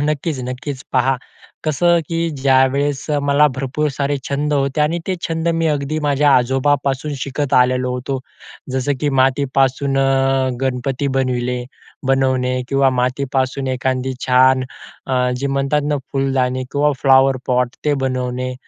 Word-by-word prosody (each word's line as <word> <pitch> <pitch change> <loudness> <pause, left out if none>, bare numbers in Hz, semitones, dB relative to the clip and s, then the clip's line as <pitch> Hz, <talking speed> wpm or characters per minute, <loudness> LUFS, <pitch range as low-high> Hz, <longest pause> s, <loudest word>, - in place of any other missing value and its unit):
हं, 145 - 0
नक्कीच, 150 0 -2
नक्कीच 130 +2 -5
पहा. 130 0 +2 0.5
कसं 170 +3 +3
की 165 0 -2
ज्यावेळेस 135 0 +1 0.2
मला 145 +1 +4
भरपूर 140 +3 -1
सारे 140 0 0
छंद 145 +2 -1
होते 140 +1 0
आणि 160 +3 +1
ते 190 - 0
छंद 165 +1 -1
मी 165 0 0
अगदी 150 +1 -1
माझ्या 145 0 +3
आजोबांपासून 135 +3 0
शिकत 140 0 -3
आलेलो 125 0 +3
होतो. 130 +2 -3 0.5
जसं 130 +2 0
की 150 - +1
मातीपासून 135 0 +1 0.6
गणपती 130 +1 -1
बनविले 125 -1 -1 0.4
बनवणे 130 -1 +1
किंवा 135 -1 +3
मातीपासून 130 +1 -1
एखादी 130 0 -1
छान 130 0 +4 0.4
अ, 125 -1 +1
जे 140 +2 -2
म्हणतात 140 +2 0
ना 150 - +1 0.2
फुलदाणी 130 -2 0
किंवा 145 +1 +2
फ्लॉवरपॉट 130 -2 +3
ते 150 - +2
बनवणे 130 -1 -2
135 Hz, 130 wpm, -18 LUFS, 130-145 Hz, 0.6 s, मला